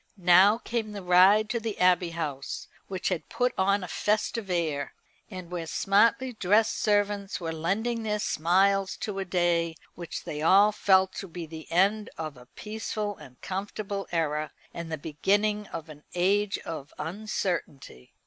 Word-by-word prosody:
Now 185 +4 +6
came 230 -3 -3
the 200 -2 -6
ride 185 +4 +6
to 235 - 0
the 225 -2 -4
Abbey 180 -1 +4
House, 150 -5 -5 0.2
which 190 -2 -2
had 180 -4 -3
put 250 0 0
on 200 +1 +2
a - - -5
festive 210 +3 -1
air, 155 -6 -1 0.3
and 185 -4 -8
where 170 -2 -4
smartly 230 +9 +2
dressed 215 +1 +2
servants 205 -1 0
were 165 -2 -3
lending 220 +9 -1
their 210 -1 -1
smiles 195 +2 +2
to 200 -2 -4
a 195 - -2
day 175 -2 +1 0.2
which 170 -2 -7
they 150 - -5
all 200 +6 +6
felt 190 -2 +3
to 195 - -5
be 170 -1 -7
the 160 0 -10
end 200 +5 +2
of 155 -3 -5
a 125 -1 -15
peaceful 210 -1 -4
and 125 -1 -14
comfortable 195 +1 -4
era, 155 -2 -1 0.2
and 170 -1 -6
the 160 - -2
beginning 205 +8 0
of 165 -1 -7
an 150 -1 -12
age 200 +3 +2
of 150 -4 -6
uncertainty. 170 - -4
190 Hz, 160 wpm, -27 LUFS, 165-210 Hz, 0.3 s, Now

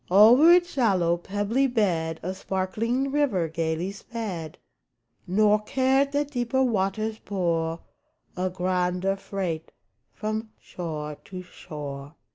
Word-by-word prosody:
Over 230 - +8
its 350 0 +5
shallow, 190 -10 +2
pebbly 205 +9 0
bed, 175 -9 0
A 185 +2 -2
sparkling 215 +8 -1
river 265 - +1
gayly 165 +3 -2
sped, 200 -7 -6 0.7
Nor 210 +3 +4
cared 265 +5 +2
that 290 0 0
deeper 250 0 +1
waters 215 -1 0
bore 165 -4 -1 0.5
A 185 +1 -1
grander 180 +1 0
freight 185 -5 -4 0.4
from 215 +1 -4
shore 150 -4 -6
to 185 -1 -7
shore. 145 -4 -8
195 Hz, 110 wpm, -26 LUFS, 170-230 Hz, 0.7 s, Over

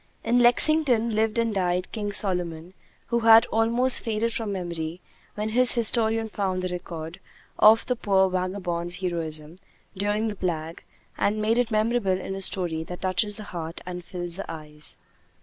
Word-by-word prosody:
In 240 +2 +2
Lexington 245 -1 +4
lived 220 +1 0
and 230 -1 0
died 180 -2 -1
"King 210 -2 -4
Solomon," 180 -4 -1 0.4
who 235 0 +1
had 225 0 +7
almost 235 +3 +4
faded 225 +1 -1
from 225 -3 -3
memory 170 -3 -5 0.4
when 210 +1 -3
his 250 +2 +5
historian 225 -1 +2
found 190 -3 -3
the 185 - -2
record 170 -1 -7 0.4
of 220 +1 +6
the 250 - -1
poor 195 -4 +2
vagabond's 180 -2 -2
heroism 165 -3 -4 0.4
during 205 +3 -1
the 210 - -4
plague, 165 -3 -4 0.4
and 210 +1 +1
made 220 +3 +1
it 245 -2 +1
memorable 215 -3 0
in 190 - -6
a 195 - -6
story 175 -4 -1
that 180 +2 -8
touches 200 +2 0
the 215 - -8
heart 165 -4 -7
and 180 -1 -6
fills 175 0 -7
the 195 - -6
eyes. 150 -1 -8
195 Hz, 165 wpm, -25 LUFS, 175-225 Hz, 0.4 s, had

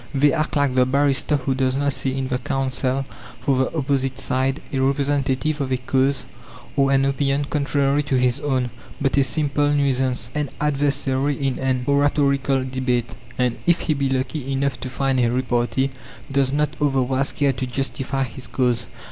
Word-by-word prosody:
They 140 0 +4
act 155 0 -1
like 145 -2 +2
the 125 0 +3
barrister 140 +2 +2
who 135 0 -1
does 130 0 +1
not 140 0 +1
see 135 0 -2
in 130 -1 -2
the 125 -1 -1
counsel 135 0 -1 0.3
for 140 - +1
the 130 +5 0
opposite 135 -2 0
side 130 +2 0
a 135 - +1
representative 140 +2 0
of 135 -1 -2
a 130 - +2
cause, 135 +2 0 0.5
or 135 -1 +3
an 135 0 +3
opinion 140 +1 +1
contrary 140 -1 +1
to 145 -2 -1
his 125 +1 +2
own, 130 -4 -1 0.3
but 135 -2 +1
a 140 - +5
simple 145 +1 +1
nuisance, 130 -4 +1
an 150 -2 -1
adversary 140 -1 0
in 135 -2 -1
an 130 -1 0
oratorical 140 -1 +2
debate; 125 -2 -1 0.2
and 125 -2 0
if 170 0 +4
he 155 - +1
be 140 -2 0
lucky 135 +1 -2
enough 135 0 -1
to 130 - -5
find 135 +1 0
a 120 -1 +3
repartee, 125 +2 0 0.4
does 135 -1 +2
not 150 +1 0
otherwise 135 -1 +1
care 140 -2 +1
to 130 +1 -4
justify 135 +1 -2
his 125 0 -7
cause. 125 -2 0
135 Hz, 175 wpm, -22 LUFS, 130-140 Hz, 0.5 s, a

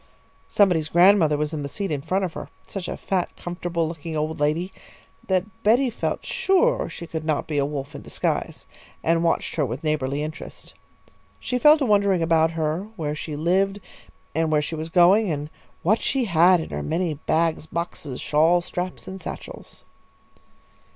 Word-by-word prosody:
Somebody's 175 -6 +2
grandmother 175 -4 +5
was 150 +1 -2
in 155 - -3
the 140 - -4
seat 195 +3 -4
in 145 -2 -1
front 190 +6 0
of 170 - -6
her, - - -7 0.2
such 190 -3 -6
a - - -4
fat, 185 -3 -1
comfortable 175 -1 -3
looking 160 0 -5
old 155 +1 -2
lady, 155 +6 0 0.5
that 185 -1 +1 0.2
Betty 240 +4 +3
felt - - -3
sure - - +2
she 170 - -8
could 160 -1 -5
not 155 -2 0
be 150 -2 -1
a 140 - +1
Wolf 145 -1 -5
in - - -8
disguise, - - -3 0.4
and 165 +1 +2
watched 170 - 0
her 155 - +2
with 130 +3 -4
neighbourly 150 -2 -1
interest. 155 +1 -8 0.7
She 250 - -2
fell 300 +3 +7
to 285 - 0
wondering 200 -5 +3
about 165 -1 +3
her, 160 +5 -1
where 150 -6 -3
she 150 0 -5
lived 190 +6 +1 0.5
and 160 0 0
where 150 - +4
she 150 +2 -4
was 160 +1 -4
going, 185 +5 +5
and 150 0 -4 0.3
what 215 +7 +3
she 265 -2 0
had 175 -1 +5
in 160 - -6
her - - -3
many 165 +1 -1
bags, 160 +2 0
boxes, 160 -6 -5
shawl 165 +4 +3
straps, 180 +1 -5
and 190 0 -7
satchels. - - -9
165 Hz, 180 wpm, -24 LUFS, 155-190 Hz, 0.7 s, fell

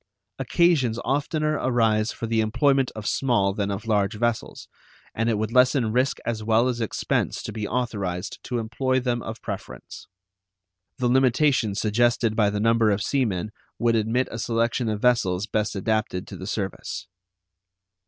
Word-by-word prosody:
Occasions 135 -4 +2
oftener 150 +2 0
arise 115 -3 +2
for - - -5
the 115 0 +1
employment 130 +4 +2
of 110 -2 -7
small 110 -8 +1
than 100 0 -2
of 100 +2 -4
large 105 -2 +1
vessels, 120 +1 -2 0.5
and 115 +1 0
it 110 - +1
would 110 +1 -2
lessen 125 -2 +3
risk 130 +4 +1
as 110 -2 -2
well 115 +3 +3
as 120 -2 -2
expense 110 - -1
to - - -5
be 105 -1 -4
authorized 100 -7 -3
to 125 - -2
employ 130 +3 0
them 125 -2 -1
of 110 +1 -7
preference. - - -8 0.9
The 125 - 0
limitation 130 -3 +3
suggested 115 +1 +1
by 105 -2 +3
the 105 0 -2
number 115 0 +3
of 100 0 0
sea 135 -2 +1
men 105 0 -3 0.3
would 115 -1 +2
admit 115 +4 +1
a 115 - -5
selection 115 +1 0
of 105 -1 -2
vessels 100 -6 +2
best 105 0 -1
adapted 100 -2 -1
to - - -8
the 95 - -7
service. 100 -3 -4
115 Hz, 165 wpm, -24 LUFS, 105-125 Hz, 0.9 s, lessen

